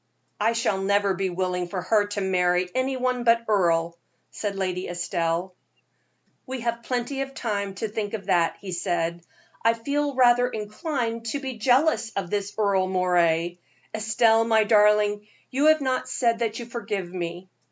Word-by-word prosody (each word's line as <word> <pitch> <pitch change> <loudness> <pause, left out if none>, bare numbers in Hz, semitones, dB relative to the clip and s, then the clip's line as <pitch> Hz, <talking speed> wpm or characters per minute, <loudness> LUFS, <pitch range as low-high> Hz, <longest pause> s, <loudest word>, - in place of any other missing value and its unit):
"I 230 - +2
shall 230 -4 0
never 200 0 +2
be 190 0 -1
willing 180 0 -2
for 185 +1 -4
her 205 +3 +2
to 205 0 -3
marry 180 -1 +1
any 260 +1 0
one 250 -1 -1
but 230 0 +3
Earle," 170 -5 +1 0.3
said 205 -2 -4
Lady 185 -1 -2
Estelle. 175 0 -2 0.9
"We 260 -1 -5
have 235 0 -2
plenty 250 +3 -2
of 270 0 -5
time 200 -4 -3
to 220 - -3
think 210 0 -3
of 200 -3 -7
that," 170 -2 +2
he 195 - -7
said. 170 -1 -1 0.4
"I 230 0 +4
feel 285 +4 -2
rather 245 -1 +4
inclined 230 +1 -3
to 280 +6 -2
be 260 -4 -6
jealous 260 +1 +3
of 190 -3 -3
this 205 -1 -2
Earle 200 -3 +2
Moray. 175 -2 +1 0.3
Estelle, 220 +1 +3
my 220 -1 +3
darling, 210 -1 +3 0.2
you 280 +4 +2
have 310 -1 +5
not 260 -1 -1
said 230 -2 +1
that 225 -2 -1
you 240 - -6
forgive 205 -6 -4
me." 175 0 -5
210 Hz, 165 wpm, -25 LUFS, 185-235 Hz, 0.9 s, have